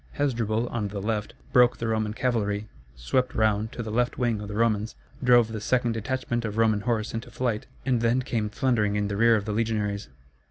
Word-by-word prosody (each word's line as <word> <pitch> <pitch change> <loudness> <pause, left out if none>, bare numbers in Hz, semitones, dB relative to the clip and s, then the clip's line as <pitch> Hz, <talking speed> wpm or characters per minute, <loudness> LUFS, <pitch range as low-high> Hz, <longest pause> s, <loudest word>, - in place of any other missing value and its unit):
Hasdrubal, 115 -5 0
on 110 -3 -2
the 100 0 -5
left, 105 +2 -2 0.2
broke 125 -1 +5
the 115 - -3
Roman 110 -1 -1
cavalry, 110 -4 -1 0.3
swept 125 - 0
round 110 0 +1
to 120 - -4
the 110 - -5
left 120 +2 0
wing 120 -4 0
of 105 - -6
the 105 - -6
Romans, 110 -1 +1 0.3
drove 120 -2 +5
the 110 -2 -5
second 120 +1 +1
detachment 120 +1 -2
of 105 -1 -4
Roman 110 -2 +3
horse 110 0 -1
into 115 +2 -5
flight, 120 -4 -2 0.2
and 125 -3 +1
then 120 +2 +2
came 110 -4 -1
thundering 110 -3 +1
in 105 0 0
the 100 - -2
rear 115 +2 +5
of 105 -2 -1
the 105 - -2
legionaries. 105 -2 -1
110 Hz, 205 wpm, -26 LUFS, 105-120 Hz, 0.3 s, broke